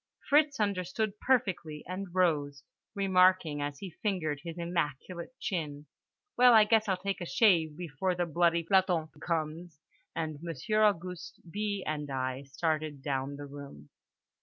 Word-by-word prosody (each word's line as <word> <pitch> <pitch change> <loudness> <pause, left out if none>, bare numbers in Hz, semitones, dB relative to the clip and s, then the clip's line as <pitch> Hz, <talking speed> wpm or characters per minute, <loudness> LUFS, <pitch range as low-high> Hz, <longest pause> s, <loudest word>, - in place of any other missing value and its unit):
Fritz 295 -2 +4
understood 200 +1 -1
perfectly, 180 - 0
and 185 +2 -4
rose, 145 -7 +1 0.3
remarking 185 -6 +3
as 145 0 -3
he 190 +2 -7
fingered 165 -9 -1
his 170 0 -7
immaculate 170 - -3
chin 150 -8 -3 0.5
"Well, 250 0 +7
I 220 - +8
guess 220 0 +3
I'll 190 - +2
take 195 +1 -3
a - - -3
shave 165 -9 +3
before 180 +2 -2
the 175 0 0
bloody 170 +1 +2
planton 180 -3 +2
comes"—and 160 -1 -5
Monsieur 170 - -1
Auguste, 180 -3 -1
B., 205 -1 -2
and 150 -1 -3
I 130 0 -2
started 155 0 -2
down 140 0 -2
the 145 0 -7
room. 140 - -11
170 Hz, 135 wpm, -30 LUFS, 150-195 Hz, 0.5 s, I